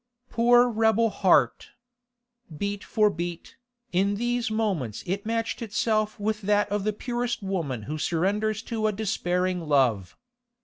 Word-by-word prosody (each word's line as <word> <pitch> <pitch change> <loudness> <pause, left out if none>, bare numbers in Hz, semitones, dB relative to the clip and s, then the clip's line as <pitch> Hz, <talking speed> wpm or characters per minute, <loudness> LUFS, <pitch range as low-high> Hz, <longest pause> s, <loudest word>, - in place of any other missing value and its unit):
Poor 240 +1 +5
rebel 225 -1 +2
heart! 145 - +2 0.8
Beat 200 +3 -3
for 210 -2 +2
beat, 175 -1 -6 0.3
in 195 +3 +1
these 240 +1 -1
moments 195 - -2
it 200 +4 -3
matched 230 +1 -2
itself 215 0 0
with 215 +1 -1
that 205 +1 +2
of 205 -1 0
the 215 - +2
purest 240 +1 -3
woman 165 - -3
who 155 +7 -5
surrenders 205 +7 0
to 220 -3 -1
a - - +2
despairing 185 -3 -1
love. 125 -10 +1
205 Hz, 135 wpm, -26 LUFS, 180-220 Hz, 0.8 s, Poor